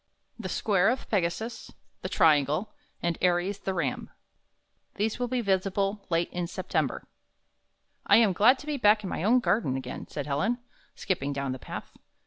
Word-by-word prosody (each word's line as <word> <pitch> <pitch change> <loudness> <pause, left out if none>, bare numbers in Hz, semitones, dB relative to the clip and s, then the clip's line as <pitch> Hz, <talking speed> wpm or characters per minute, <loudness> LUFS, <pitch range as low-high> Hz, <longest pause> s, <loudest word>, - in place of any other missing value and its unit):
THE 190 -5 -5
SQUARE 195 +1 +2
OF 255 +2 -2
PEGASUS, 220 +4 -2 0.3
THE - - -4
TRIANGLE, 155 - +3 0.3
AND 170 -1 -1
ARIES, 180 +3 +1
THE 190 - -3
RAM 150 -7 -2 0.9
These 215 +3 -1
will 245 - 0
he 250 0 -1
visible 195 0 0
late 170 0 0
in 175 -1 -2
September 185 - -2 1.0
"1 - - +7
am 220 -4 +4
glad 235 +9 +5
to 290 - -11
be 300 -1 -2
back 210 -3 +4
in 190 - -4
my - - -3
own 245 +5 +4
garden 170 - +1
again," 130 -1 -6
said 145 - -5
Helen, 150 +12 0 0.4
skipping 145 -7 -2
down 140 -1 -2
the 130 - -5
path. - - -8
195 Hz, 165 wpm, -28 LUFS, 165-220 Hz, 1.0 s, 1